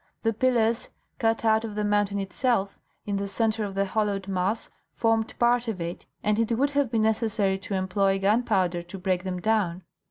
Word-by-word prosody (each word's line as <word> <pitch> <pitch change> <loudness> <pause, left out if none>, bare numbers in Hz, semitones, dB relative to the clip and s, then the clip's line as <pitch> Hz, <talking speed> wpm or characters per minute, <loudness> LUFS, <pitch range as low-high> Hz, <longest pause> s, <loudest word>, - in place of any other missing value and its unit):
The 225 0 +2
pillars, 235 -1 +1 0.3
cut 225 0 +1
out 220 0 +4
of 215 -2 -5
the 210 - -1
mountain 205 -1 +1
itself, 200 +1 -1 0.3
in 200 -1 -1
the 200 0 -2
centre 220 +2 0
of 200 -2 -4
the 195 0 +1
hollowed 200 -1 -1
mass, 195 +3 -1 0.2
formed 225 -1 +1
part 240 0 +3
of 215 -5 -3
it, 170 +1 -5 0.2
and 210 +1 +1
it 230 0 +1
would 280 +3 +2
have 285 -3 +1
been 225 -2 +1
necessary 215 -3 +1
to 195 +1 -4
employ 195 +1 +1
gunpowder 195 -4 +1
to 175 +3 -9
break 185 -1 -1
them 185 -1 -3
down. 190 -4 0
210 Hz, 190 wpm, -26 LUFS, 195-225 Hz, 0.3 s, out